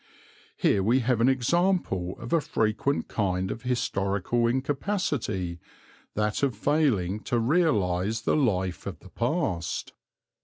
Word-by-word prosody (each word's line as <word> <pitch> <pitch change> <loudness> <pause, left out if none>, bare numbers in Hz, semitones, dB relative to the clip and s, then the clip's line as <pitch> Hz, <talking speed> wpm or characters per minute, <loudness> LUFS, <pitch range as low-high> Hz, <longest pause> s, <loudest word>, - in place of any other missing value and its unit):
Here 100 - +3
we 120 +7 +3
have 120 -1 +1
an 125 - +5
example 130 - +1
of 115 - -6
a 165 - +4
frequent 115 +4 0
kind 95 -2 -1
of 115 - -5
historical 115 -2 0
incapacity, 130 - -1 0.6
that 105 0 0
of 135 -5 +1
failing 110 - +1
to 120 - 0
realize 110 - +1
the - - +2
life 95 -10 0
of - - -5
the - - -14
past. 115 - -2
115 Hz, 125 wpm, -27 LUFS, 95-135 Hz, 0.6 s, an